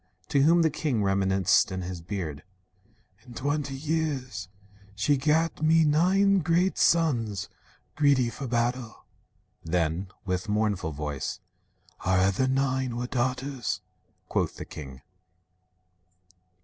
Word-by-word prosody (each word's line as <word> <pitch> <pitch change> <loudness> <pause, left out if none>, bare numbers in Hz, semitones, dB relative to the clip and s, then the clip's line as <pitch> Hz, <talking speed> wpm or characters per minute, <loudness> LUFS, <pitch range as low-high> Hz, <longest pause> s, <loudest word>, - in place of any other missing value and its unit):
To 140 - +3
whom 165 +4 +5
the 160 - +3
king, 140 -8 -1
rem'niscent 95 -1 +3
in 95 -1 -3
his 90 -1 -6
beard: 85 -5 -5 0.8
"In 120 -1 -13
twenty 145 +1 -2
years 135 -9 -2 0.5
she 125 +9 +2
gat 155 +4 +1
me 160 +1 +5
nine 190 +6 +4
great 175 +3 +1
sons, 120 - +2 0.5
Greedy 140 -5 +3
for 135 +1 -6
battle." 120 0 -2 0.6
Then, 85 +2 -1 0.2
with 90 +2 -2
mournful 105 -5 0
voice, 75 -2 -4 0.6
"Our 95 0 +1
other 100 +7 +2
nine 130 -2 0
were 120 - -2
daughters," 130 0 -2 0.5
quoth - - -1
the - - -7
king. 65 -4 -10
125 Hz, 115 wpm, -27 LUFS, 95-150 Hz, 0.8 s, whom